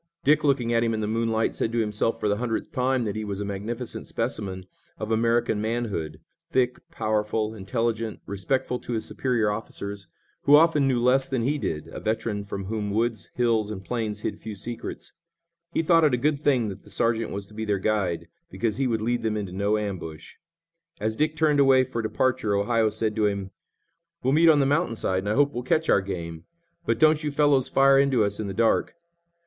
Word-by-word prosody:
Dick, 150 +2 +4
looking 130 -5 +2
at 115 0 +3
him 115 -1 +1
in - - -3
the 110 - -1
moonlight, 115 0 0
said 115 - -1
to 120 - -2
himself 110 +1 0
for 105 - 0
the 100 0 +1
hundredth 115 -1 -3
time 130 0 +1
that 105 -2 -3
he 110 - -3
was 100 -2 -4
a 100 - -3
magnificent 110 +5 -5
specimen 95 -2 -3 0.3
of 110 0 -4
American 115 -1 +2
manhood, 105 -9 -3 0.3
thick, 125 -5 +1
powerful, 110 0 -1
intelligent, 115 +2 -2
respectful 125 +6 -1
to 120 - -5
his 110 - -1
superior 120 -5 0
officers, 100 -2 -5 0.4
who 145 - +8
often 150 -3 +5
knew 130 -3 +2
less 125 +2 +3
than 130 -4 0
he 145 +4 0
did, 75 - -3
a - - -7
veteran 110 -1 -2
from 100 -1 -5
whom 105 0 -3
woods, 110 -4 -1
hills, 115 -3 +1
and 95 -3 -7
plains 110 -4 -3
hid - - -3
few 110 -2 -7
secrets. 115 +4 -6 0.6
He 165 - 0
thought 165 0 +4
it 145 -5 +4
a - - -2
good 145 +3 +1
thing 130 -7 +2
that 95 - -8
the - - -17
sergeant 115 -1 0
was 100 0 -5
to 105 - -18
be 110 +1 -4
their 105 -2 0
guide, 95 -4 -1 0.2
because 115 -2 -2
he 135 - +1
would 110 -3 -1
lead 120 +1 0
them 110 -1 -1
into 100 -3 -4
no 100 +3 +1
ambush. 90 -7 -6 0.6
As 110 0 -1
Dick 155 +4 0
turned 150 -2 +3
away 135 -2 +6
for 125 -2 -3
departure 115 -1 0
Ohio 110 +2 +2
said 110 0 -1
to 105 -1 +3
him: 100 -2 -3 0.7
"We'll 130 - +2
meet 165 +2 +6
on 150 -2 +5
the - - +3
mountain 145 -2 +1
side, 95 -4 0
and 100 +2 -3
I 105 - +1
hope 145 0 +3
we'll 120 - -3
catch 155 +6 0
our 100 - +5
game, 85 -4 -6 0.4
but 115 - +2
don't 155 +3 +4
you 150 - 0
fellows 145 -2 +3
fire 135 0 +5
into 135 -5 +3
us 100 0 -1
in 110 - -3
the 95 - -5
dark." 115 +7 +2
115 Hz, 210 wpm, -25 LUFS, 105-130 Hz, 0.7 s, who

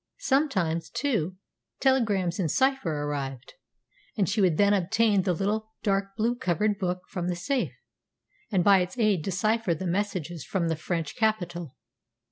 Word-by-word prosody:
Sometimes, 240 - 0
too, 200 - -1 0.4
telegrams 210 -9 +2
in 170 -4 +1
cipher 265 - +2
arrived, 135 -3 -4 0.6
and 195 -4 +2
she 210 +2 +1
would 175 -5 +3
then 200 0 +4
obtain 205 +2 +3
the 185 - 0
little, 215 +5 -2
dark 195 -1 0
blue 230 +3 +2
covered 210 -1 0
book 180 -1 -2
from 180 -3 -4
the 180 - -1
safe, 255 +10 -2 0.7
and 185 -4 +2
by 200 0 +6
its 180 +5 -3
aid 210 -7 +2
decipher 195 +2 0
the 185 - -5
messages 175 -4 -2
from 175 -4 -1
the 160 - +1
French 165 0 -3
capital. 175 - -1
195 Hz, 150 wpm, -27 LUFS, 175-220 Hz, 0.7 s, by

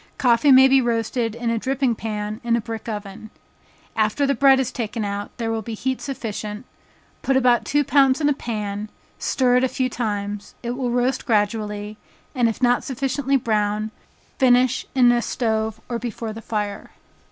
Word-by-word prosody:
Coffee 245 +2 +4
may 265 0 +8
be 265 0 +5
roasted 230 -1 -1
in 235 -1 -2
a 230 - 0
dripping 265 0 0
pan 215 0 -4
in 235 -1 +2
a - - +1
brick 225 0 -6
oven. 205 0 -7 0.7
After 215 +6 +1
the 280 - +2
bread 275 -1 +5
is 255 -1 -1
taken 225 -3 -3
out, 200 0 -4
there 230 -2 -2
will 225 0 -2
be 225 +1 -6
heat 260 +3 -2
sufficient, 220 -4 -5 0.6
put 270 -1 +2
about 245 -2 +3
two 290 +1 +2
pounds 275 -1 +4
in 295 - +2
a 290 - +3
pan, 210 -4 -4 0.3
stir 250 -2 +2
it 250 - +2
a - - +4
few 255 0 -1
times 205 -3 -4
it 235 - -2
will 250 0 -2
roast 245 +2 0
gradually, 210 -1 -1 0.4
and 245 -4 +2
if 225 +3 -5
not 245 0 +3
sufficiently 270 0 0
brown, 215 -2 -1 0.5
finish 255 -1 +3
in 245 -2 +6
a 240 0 +2
stove 220 -2 -1
or 235 -1 -3
before 230 -1 -5
the 225 - -8
fire. 210 -2 -4
235 Hz, 180 wpm, -22 LUFS, 215-260 Hz, 0.7 s, may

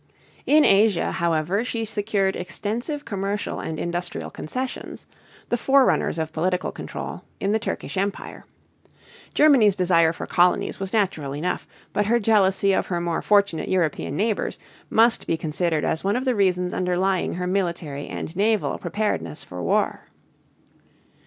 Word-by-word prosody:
In 300 +1 +6
Asia, 200 -1 +4
however, 170 +5 0
she 230 -2 -3
secured 205 -2 0
extensive 230 - -4
commercial 200 -1 -3
and 160 - -4
industrial 175 +2 -4
concessions 255 +10 -5 0.4
the 240 - +1
forerunners 265 -7 +3
of 160 -1 -3
political 180 +3 0
control - - -6 0.2
in 200 - 0
the 220 - +2
Turkish 210 - -4
Empire. 200 +2 -3 0.9
Germany's 260 -10 +5
desire 170 -4 +3
for 165 - -6
colonies 175 +1 +2
was 195 -1 -4
natural 180 -10 0
enough, 165 +5 -3 0.3
but 205 -1 +1
her 235 +2 +4
jealousy 200 -3 +3
of - - 0
her 175 -2 -1
more 170 -1 -1
fortunate 200 -6 +2
European 165 -6 0
neighbors 210 +4 -1 0.3
must 230 +1 +3
be 165 - +1
considered 160 0 -1
as 160 - -1
one 200 +2 +1
of 255 +2 -1
the 255 - +2
reasons 180 -4 +1
underlying 185 +1 0
her 180 +1 -3
military 170 -6 -2
and 165 - -6
naval 215 +2 +1
preparedness 85 - -2
for 90 0 -8
war. 85 - 0
190 Hz, 145 wpm, -24 LUFS, 170-215 Hz, 0.9 s, In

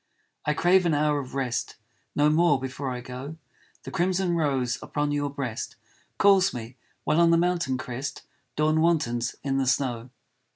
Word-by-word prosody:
I 150 - +2
crave 180 +1 +4
an 160 - +2
hour 150 0 +2
of 130 -1 -7
rest 130 -3 -2 0.4
No 150 +1 +4
more 155 -3 +4
before 130 +1 -4
I 125 -1 -4
go, 130 +5 -7 0.5
The - - -7
crimson 185 -1 +1
rose 135 -6 0
upon 145 0 -2
your 145 0 0
breast 135 -5 -5 0.4
Calls 195 -5 +4
me, 120 +1 -7 0.3
while 155 +3 +2
on 170 - +5
the 165 - +5
mountain 170 -6 +1
crest 130 +2 -5 0.3
Dawn 155 +1 +2
wantons 120 -9 +1
in 135 -1 0
the 135 - 0
snow. 125 -2 0
145 Hz, 165 wpm, -26 LUFS, 130-165 Hz, 0.5 s, on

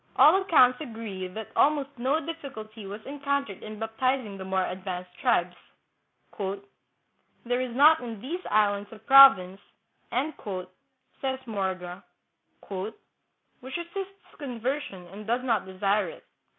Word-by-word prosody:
All 370 +6 +7
accounts 255 -9 +5
agree 220 -8 -6
that 215 +4 -8
almost 285 -1 +3
no 270 +6 +2
difficulty 225 -10 -7
was 205 +2 -8
encountered 280 -6 -2
in 215 0 -8
baptiz 255 +4 0
ing 200 -2 -8
the - - -5
more 190 0 0
advanced 180 -1 -5
tribes. 180 -8 +2 1.4
" - - -42
There 245 +1 0
is 250 -2 -4
not 305 +4 +7
in 230 -4 -7
these 315 - -5
islands 205 -1 +2
a 220 - -10
province," 215 -6 +7 0.5
says 260 +1 -5
Morga, 190 -4 -3 0.4
" - - -26 0.9
which 260 +4 -6
resists 385 +3 -7
conver 265 +1 -2
sion 190 -11 -9
and 205 +3 -10
does 240 +2 0
not 225 -7 0
desire 195 +1 +1
it." - - -13
230 Hz, 135 wpm, -27 LUFS, 195-275 Hz, 1.4 s, All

